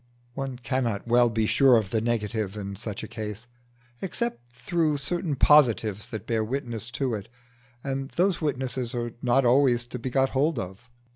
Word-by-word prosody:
One 135 -1 -4
cannot 120 -4 -1
well 120 0 +5
be 110 -1 0
sure 130 +2 +5
of 105 -4 -1
the 110 - +1
negative 110 -3 -1
in 100 -1 -5
such 105 0 -6
a - - -5
case, 110 0 -6 0.6
except 185 - -3
through 150 +5 0
certain 155 +2 -2
positives 115 -8 +4
that 110 -4 -6
bear 115 -2 0
witness 115 -2 -4
to 130 -4 0
it; 105 +1 -5 0.5
and 135 -1 -3
those 180 +2 +1
witnesses 130 -4 -2
are 120 -1 -2
not 125 +1 +3
always 125 -1 +4
to 125 +1 -7
be 130 - -3
got 135 +1 +2
hold 145 +2 +1
of. 95 +5 -6
120 Hz, 170 wpm, -26 LUFS, 110-135 Hz, 0.6 s, well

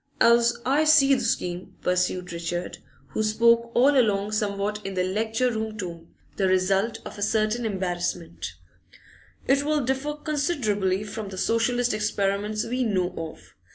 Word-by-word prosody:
'As 235 0 +5
I 280 +4 +3
see 305 -3 +6
the 265 - +2
scheme,' 180 -6 -2
pursued 180 -1 0
Richard, 175 +1 -4 0.3
who - - -2
spoke 235 +2 +3
all 275 +4 +5
along 210 -5 +2
somewhat 210 0 -2
in 195 0 -5
the 185 - +1
lecture 225 +6 0
room 220 -1 -4
tone, 170 -4 -6 0.3
the 195 - +2
result 190 +4 +1
of - - -8
a - - -7
certain 215 +2 +1
embarrassment, 175 - -3 0.9
'it 275 +1 +4
will 300 +1 +1
differ 270 +3 -1
considerably 245 - -1
from 210 0 -6
the 190 - -8
Socialist 235 +3 +1
experiments 210 0 -1
we 250 +2 -1
know 185 -5 0
of. 155 - -8
215 Hz, 150 wpm, -25 LUFS, 185-240 Hz, 0.9 s, see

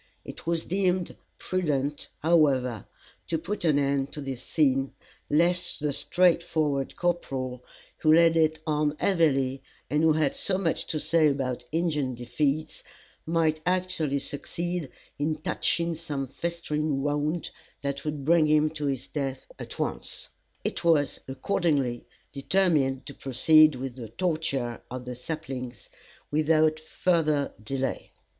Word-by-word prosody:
It - - -10
was 170 -1 0
deemed 185 -1 0 0.2
prudent, 150 -6 -1
however, 135 - +2 0.4
to 165 - 0
put 175 +6 -4
an 155 -4 +3
end 140 -1 +1
to - - -6
this 135 -3 -5
scene, 135 -3 +1 0.4
lest 175 +4 +2
the 150 -1 -1
straightforward 160 -5 +1
corporal, 130 -8 -2 0.3
who 155 - +3
laid 165 +1 +6
it 160 -1 +3
on 150 -1 +1
heavily, 135 -8 +2 0.3
and 150 +1 +2
who 160 -1 +5
had 155 -2 +1
so 190 - -1
much 180 -4 -1
to 155 - -1
say 160 0 +3
about 130 -4 -1
Indian 150 -6 0
defeats, 140 +6 -1 0.5
might 160 -1 +1
actually 180 -5 0
succeed 170 +3 -4 0.3
in 155 +2 0
touching 170 +1 0
some 150 -4 -4
festering 150 -1 -2
wound 150 +3 -1 0.3
that 140 0 -2
would 150 -3 -4
bring 165 0 +5
him 155 0 +3
to 150 -2 -3
his 135 -3 -2
death 135 -3 -3
at - - -7
once. - - -4 0.3
It - - -3
was, 160 -4 +3
accordingly, 135 -3 0 0.3
determined 140 -4 +1
to 140 - -7
proceed 155 +4 +5
with 130 0 -5
the 115 -3 -7
torture 140 - -1
of 125 0 -6
the 125 0 -5
saplings 130 -3 -6 0.4
without 155 +1 +3
further 155 -3 +1
delay. 135 +3 -3
150 Hz, 135 wpm, -27 LUFS, 135-165 Hz, 0.5 s, laid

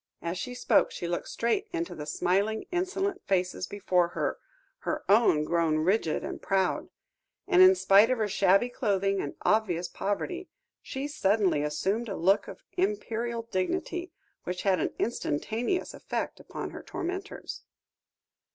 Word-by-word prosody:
As 170 +2 -2
she 250 +3 -5
spoke, 245 - +3
she 175 - -5
looked 175 0 -2
straight 235 - 0
into 340 -1 -3
the 150 -1 -7
smiling, 200 +7 0
insolent 375 +2 -1
faces 185 -1 0
before 185 -3 +1
her, - - -1 0.4
her - - -3
own 200 -8 +5
grown 165 -1 +1
rigid 165 +1 +1
and - - -5
proud; 190 -1 0 0.6
and 370 -1 +5
in 375 0 +9
spite 205 - +6
of 255 - +2
her 215 -2 +1
shabby 195 +3 +3
clothing 200 -5 0
and 145 - -5
obvious 185 -5 +2
poverty, 350 - -3 0.3
she 270 +2 -4
suddenly 200 - +2
assumed 195 +10 -1
a 195 - -3
look 190 +5 +3
of - - -10
imperial 235 - -1
dignity, 355 - -2 0.3
which 180 0 -4
had 190 -2 +3
an - - 0
instantaneous 230 - -1
effect - - -4
upon - - -6
her - - -8
tormentors. 375 +3 -5
205 Hz, 145 wpm, -28 LUFS, 185-285 Hz, 0.6 s, in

